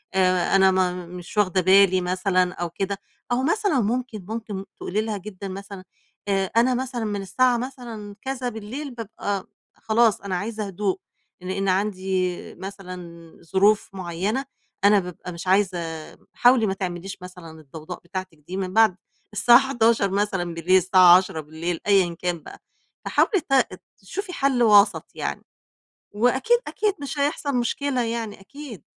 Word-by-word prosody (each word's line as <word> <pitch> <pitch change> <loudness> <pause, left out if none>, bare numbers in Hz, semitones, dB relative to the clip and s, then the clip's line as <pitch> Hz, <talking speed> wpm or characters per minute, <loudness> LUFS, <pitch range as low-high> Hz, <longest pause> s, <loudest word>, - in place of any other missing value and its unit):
آآ 185 0 +3
أنا 190 0 +5
ما 180 -1 0
مش 180 +3 -10
واخدة 185 -2 +3
بالي 190 0 +5
مثلًا 185 0 +1
أو 175 0 -4
كده، 195 +3 -3 0.3
أو 250 +2 +1
مثلًا 390 -2 +1
مُمكن، 225 -2 -2
مُمكن 215 -4 -5
تقولي 210 +4 -2
لها 215 -1 -3
جدًا 195 0 -8
مثلًا 195 0 -8 0.5
آآ 195 -1 +2
أنا 250 +2 +4
مثلًا 245 -2 -3
من 205 -1 -2
الساعة 245 +6 +2
مثلًا 235 -5 -7
كذا 265 -2 -3
بالليل 240 +6 -6
بابقى 205 -3 -4 0.3
خلاص 225 0 +2
أنا 200 -2 -3
عايزة 215 +1 -4
هُدوء، 195 0 -2 0.4
لإن 190 +2 -2
عندي 185 -2 0 0.2
مثلًا 190 -1 -8 0.5
ظروف 205 +2 +4
مُعيَّنة، 190 +8 -2 0.4
أنا 205 0 +6
بابقى 180 0 -7
مش 170 +2 -8
عايزة 190 -1 +3 0.6
حاولي 245 -2 +5
ما 190 - 0
تعمليش 185 0 -5
مثلًا 175 -3 -11
الضَّوضاء 155 +4 -9
بتاعتِك 185 -1 -6
دي 185 - -5
من 185 -1 -3
بعد 220 -4 +5 0.4
السَّاعة 240 +4 +7
23:00 230 -6 +2
مثلًا 195 -4 -1
بالليل، 180 +3 +3
السَّاعة 185 -1 +7
22:00 165 -1 -3
أيًّا 190 -4 +4
كان 175 -2 -2
بقى، - - -11 0.5
فحاولي 395 -5 +2
ت 250 -8 +2 0.2
تشُوفي 360 - -6
حَلّ 270 -4 +2
وسط 205 -6 +5
يعني، - - -4 0.7
وأكيد، 260 - +3
أكيد 420 -2 0
مش 285 +1 -5
هيحصل 285 -1 0
مُشكلة 250 +2 0
يعني 225 -3 -4
أكيد. 255 - -10
200 Hz, 145 wpm, -24 LUFS, 185-235 Hz, 0.7 s, السَّاعة